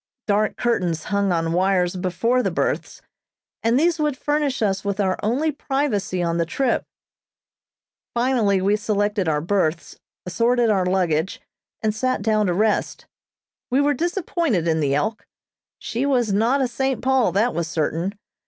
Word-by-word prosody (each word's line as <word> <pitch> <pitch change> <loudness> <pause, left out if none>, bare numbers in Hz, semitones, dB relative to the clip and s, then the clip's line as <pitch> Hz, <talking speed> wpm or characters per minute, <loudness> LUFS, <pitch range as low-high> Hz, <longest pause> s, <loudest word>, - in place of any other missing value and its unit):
Dark 210 +1 +1
curtains 180 -9 0
hung 200 -1 +2
on 165 -1 0
wires 185 0 +1
before 195 +7 0
the - - 0
berths, - - -2 0.6
and 230 +3 +2
these 335 +1 +2
would 300 -3 0
furnish 290 -4 0
us 195 -2 0
with 200 0 -2
our 190 -2 +1
only 260 +9 0
privacy 265 -11 -1
on 170 0 0
the 170 - +2
trip. 255 +7 0 1.3
Finally 235 -6 +2
we 200 +2 +3
selected 205 -2 0
our 150 -1 0
berths, 170 -2 -1 0.3
assorted 230 +5 +2
our 190 -3 +1
luggage, 180 -2 0 0.4
and 215 -1 +1
sat 255 0 -1
down 215 -1 +2
to 180 - +1
rest. 215 +2 0 0.6
We 255 - +2
were 290 +1 +3
disappointed 335 - -1
in 160 -1 +2
the 140 -2 +1
"Elk." 215 +9 -2 0.5
She 240 +5 -2
was 245 -7 +1
not 235 +7 +2
a 260 - +2
"St. 265 +2 -2
Paul," 260 -6 +3
that 220 +6 +2
was 170 -1 -2
certain. 165 +4 -2
210 Hz, 155 wpm, -22 LUFS, 185-255 Hz, 1.3 s, we